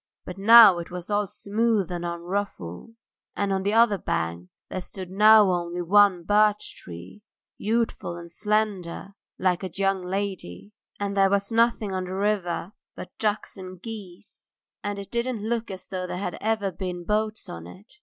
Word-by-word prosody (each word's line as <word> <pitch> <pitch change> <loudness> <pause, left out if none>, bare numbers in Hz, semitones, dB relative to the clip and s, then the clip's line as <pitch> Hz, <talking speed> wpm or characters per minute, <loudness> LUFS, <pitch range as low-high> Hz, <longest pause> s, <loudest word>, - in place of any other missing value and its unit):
But 180 +1 -8
now 215 -3 +9
it 170 - -7
was 180 +2 -7
all 205 0 +1
smooth 210 -2 0
and 175 -1 -4
unruffled, 170 - -5 0.4
and 200 -1 0
on 190 - 0
the 200 +2 0
other 225 -3 +4
bank 85 - -3 0.2
there 185 - -4
stood 185 0 -9
now 210 0 +6
only 175 0 -2
one 195 -1 +4
birch 210 +2 +2
tree, 85 - -11 0.4
youthful 225 -5 -1
and 170 -1 -9
slender 205 -2 -1 0.3
like 180 -2 +1
a 190 - -3
young 195 +1 0
lady, 190 - -4 0.3
and 200 -1 -2
there 195 -1 +4
was 200 +2 0
nothing 230 -3 +2
on 185 -1 -2
the 185 +1 -5
river 195 -3 -1 0.2
but - - -9
ducks 210 -1 -2
and 185 -1 -9
geese, 205 -6 -10 0.3
and 205 0 -3
it 200 -1 -8
didn't 235 -2 -2
look 235 0 -2
as 190 -1 -8
though 185 -1 -4
there 180 - -4
had 180 -1 -3
ever 215 -3 0
been 180 -1 -5
boats 215 +2 -1
on 85 0 -8
it. 195 - -15
195 Hz, 170 wpm, -25 LUFS, 180-210 Hz, 0.4 s, now